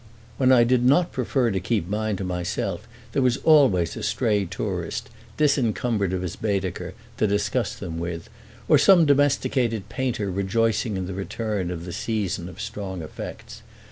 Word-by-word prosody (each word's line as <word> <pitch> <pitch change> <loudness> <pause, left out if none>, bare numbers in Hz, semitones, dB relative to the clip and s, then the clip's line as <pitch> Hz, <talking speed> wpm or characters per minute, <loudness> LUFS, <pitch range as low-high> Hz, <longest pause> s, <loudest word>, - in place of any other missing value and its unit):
When 130 -1 +4
I 125 -2 +7
did 120 +1 +2
not 155 +8 +4
prefer 125 -1 0
to 95 - 0
keep 95 -1 -1
mine 105 +1 -1
to 95 - -4
myself 90 0 -3 0.2
there 135 - +1
was 125 -1 +2
always 130 - +4
a - - -6
stray 105 -3 +1
tourist, 90 0 -4 0.3
disencumbered 120 - +1
of 95 -1 -2
his 90 - -4
Baedeker, 95 -3 -2 0.2
to 110 - +2
discuss 105 +3 0
them 85 -4 -6
with, 85 -1 -5 0.4
or - - +6
some 180 -4 +6
domesticated 130 -6 +1
painter 120 -7 -2
rejoicing 105 +3 0
in 95 - -3
the 95 - -5
return 100 0 -3
of 85 -1 -5
the 90 - -6
season 100 -6 -2
of 90 - -12
strong 100 -4 -5
effects. 80 - -8
105 Hz, 165 wpm, -24 LUFS, 90-120 Hz, 0.4 s, I